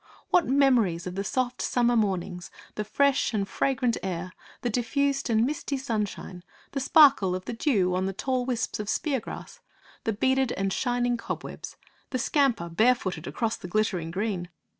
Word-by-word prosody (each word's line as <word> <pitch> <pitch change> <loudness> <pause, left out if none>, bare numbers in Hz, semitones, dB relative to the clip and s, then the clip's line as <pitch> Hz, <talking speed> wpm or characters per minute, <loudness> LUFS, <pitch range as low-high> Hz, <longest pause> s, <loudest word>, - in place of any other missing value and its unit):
What 355 - +4
memories 245 -11 +3
of 180 - -4
the 195 +2 -2
soft 255 +2 -1
summer 240 -1 +2
mornings; 185 -4 -1 0.2
the 210 - -3
fresh 265 +2 +2
and 200 -2 0
fragrant 255 -2 0
air; 185 -1 -4 0.3
the 245 - +1
diffused 275 +4 0
and 225 0 +3
misty 285 0 -2
sunshine; 210 -7 -4 0.3
the 275 - -2
sparkle 270 - +5
of 185 - -6
the - - -4
dew 215 -8 +1
on 185 +1 0
the - - -1
tall 255 +5 -1
wisps 245 -3 -2
of 210 -1 -4
speargrass; 270 0 -3 0.4
the 225 - 0
beaded 265 +3 +1
and 195 0 -1
shining 245 -1 0
cobwebs; - - -6 0.3
the 260 - -1
scamper, 265 - +1
barefooted, 185 -3 +1
across 230 -2 -1
the - - -8
glittering 180 -4 0
green! 185 -1 -2
230 Hz, 160 wpm, -27 LUFS, 190-260 Hz, 0.4 s, sparkle